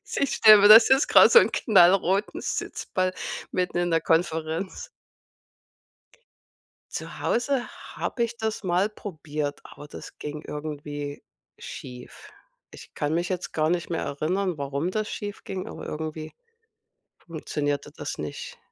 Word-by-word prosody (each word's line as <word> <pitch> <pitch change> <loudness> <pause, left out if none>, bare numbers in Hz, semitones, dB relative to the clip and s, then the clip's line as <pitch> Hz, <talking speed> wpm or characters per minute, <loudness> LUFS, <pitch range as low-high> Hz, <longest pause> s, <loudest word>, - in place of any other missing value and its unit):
ich 280 - 0
stelle 215 -2 +8
mir, 205 - +7
das 225 +3 +9
ist 265 +2 +4
grad - - +7
so 475 - +10
'n - - +2
knallroten 195 -1 +3
Sitzball 185 0 -2 0.4
mitten 180 -1 -1
in 175 -1 0
der 165 -1 +2
Konferenz. 165 +2 -1 2.1
Zu - - -7
Hause 250 +1 0 0.3
habe 240 - -3
ich 235 0 -3
das 220 -3 -4
mal 180 +4 +1
probiert, 155 -8 -5
aber 145 +1 -12
das - - -11
ging 150 0 -6
irgendwie 145 -1 -6 0.3
schief. 125 -1 -10 0.4
Ich - - -14
kann 150 +1 -2
mich 170 +2 -1
jetzt 185 -1 -4
gar 155 0 +1
nicht 175 -1 -1
mehr 165 - -2
erinnern, 175 +5 -2
warum 140 +5 -3
das 215 0 -2
schief 205 0 -7
ging, 190 -1 -5
aber - - -9
irgendwie 155 0 -6 0.9
funktionierte 145 -3 -4
das - - -6
nicht. 485 0 -7
175 Hz, 140 wpm, -25 LUFS, 150-205 Hz, 2.1 s, so